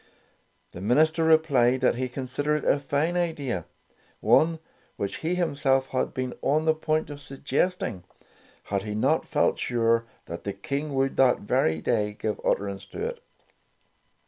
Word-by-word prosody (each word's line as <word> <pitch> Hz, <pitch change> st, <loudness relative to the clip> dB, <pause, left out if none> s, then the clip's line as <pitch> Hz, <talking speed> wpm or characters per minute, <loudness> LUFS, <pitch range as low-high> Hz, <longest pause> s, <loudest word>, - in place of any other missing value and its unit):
The 90 Hz, -, -9 dB
minister 155 Hz, -, +3 dB
replied 140 Hz, -6 st, +4 dB
that 130 Hz, -, +4 dB
he 130 Hz, +1 st, -3 dB
considered 140 Hz, +4 st, -2 dB
it -, -, -3 dB
a 145 Hz, -, +1 dB
fine 145 Hz, +4 st, 0 dB
idea; 145 Hz, -, -1 dB, 0.5 s
one 165 Hz, +1 st, +4 dB, 0.4 s
which 100 Hz, -, -3 dB
he 170 Hz, +3 st, -1 dB
himself 140 Hz, -6 st, +1 dB
had 130 Hz, -, -1 dB
been 130 Hz, -2 st, -3 dB
on 155 Hz, +3 st, +1 dB
the 160 Hz, -, +4 dB
point 155 Hz, -1 st, -1 dB
of 145 Hz, 0 st, -8 dB
suggesting, 135 Hz, -, -2 dB, 0.6 s
had 100 Hz, -1 st, -2 dB
he 105 Hz, +1 st, -5 dB
not 110 Hz, -, +1 dB
felt -, -, +1 dB
sure 115 Hz, -1 st, +1 dB, 0.2 s
that 85 Hz, -, -7 dB
the 100 Hz, -, -3 dB
King 140 Hz, +8 st, -4 dB
would 135 Hz, 0 st, 0 dB
that 130 Hz, -2 st, +4 dB
very 100 Hz, -9 st, +1 dB
day 105 Hz, -1 st, 0 dB
give 110 Hz, -1 st, -2 dB
utterance 100 Hz, -1 st, -1 dB
to 435 Hz, -, -5 dB
it. 480 Hz, 0 st, -5 dB
135 Hz, 155 wpm, -26 LUFS, 115-155 Hz, 0.6 s, replied